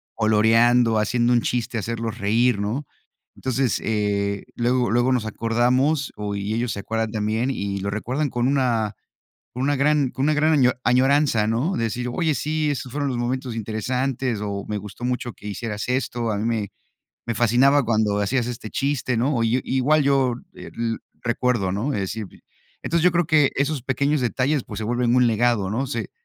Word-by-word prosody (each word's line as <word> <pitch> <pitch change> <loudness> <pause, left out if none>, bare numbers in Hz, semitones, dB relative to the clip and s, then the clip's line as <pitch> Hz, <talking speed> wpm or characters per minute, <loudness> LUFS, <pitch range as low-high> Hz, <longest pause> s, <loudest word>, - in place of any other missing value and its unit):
coloreando, 115 +2 +4
haciendo 120 +3 +2
un 120 - +3
chiste, 120 0 -2
hacerlos 115 +1 -3
reír, 115 +2 +2
¿no? 115 +8 -2 0.5
Entonces, 130 -4 -1
eh, 100 -2 -1
luego 125 +1 +1
luego 120 +2 +2
nos 120 -4 0
acordamos 125 +6 +1
o 105 -1 -3
y 100 +2 -3
ellos 115 0 -1
se - - -5
acuerdan 110 +1 -2
también 110 +3 -1
y 100 -6 -3
lo 100 +1 -3
recuerdan 125 +8 -2
con 120 -1 -1
una 120 -6 +1 0.6
con 125 - -5
una 145 +1 +2
gran 145 -1 +2
con 130 - -4
una 155 - +3
gran 155 +1 +2
año 130 -4 +4
añoranza, 130 -2 +3
¿no?, 125 +12 0
de 115 - -1
decir: 125 +3 -2
''Oye, 160 +1 0
sí, 155 0 -1
esos 130 -2 -5
fueron 145 +1 -2
los 125 - -2
momentos 125 0 -2
interesantes'', 120 +2 -2
o 100 -1 -4
''Me 105 - -2
gustó 105 +4 -8
mucho 125 -1 -2
que 105 - -11
hicieras 105 +1 -4
esto, 120 -3 -1
a 105 - -1
mí 105 - -2
me 110 -4 -1 0.6
me 120 - -1
fascinaba 125 +5 +4
cuando 110 -2 +1
hacías 120 +4 0
este 115 -3 -6
chiste'', 135 -3 -1
¿no?, 135 +3 +1
o 115 - +1
yo, 115 +3 +2
igual 145 +4 +2
yo, 135 -3 +2 0.2
eh, - - -10
l 115 -1 -2 0.2
recuerdo, 120 -5 0
¿no?, 115 +9 -1
es - - -1
decir, 100 +3 -4 0.6
entonces 170 -1 0
yo 180 - +6
creo 175 -1 +1
que 150 -3 +4
esos 140 -2 0
pequeños 140 +3 0
detalles, 130 +3 0
pues - - -7
se 110 - -3
vuelven 120 +1 +1
un 125 -1 +5
legado, 115 -3 +2
¿no?, 130 +5 -1
se 115 -6 -4
120 Hz, 190 wpm, -23 LUFS, 110-135 Hz, 0.6 s, yo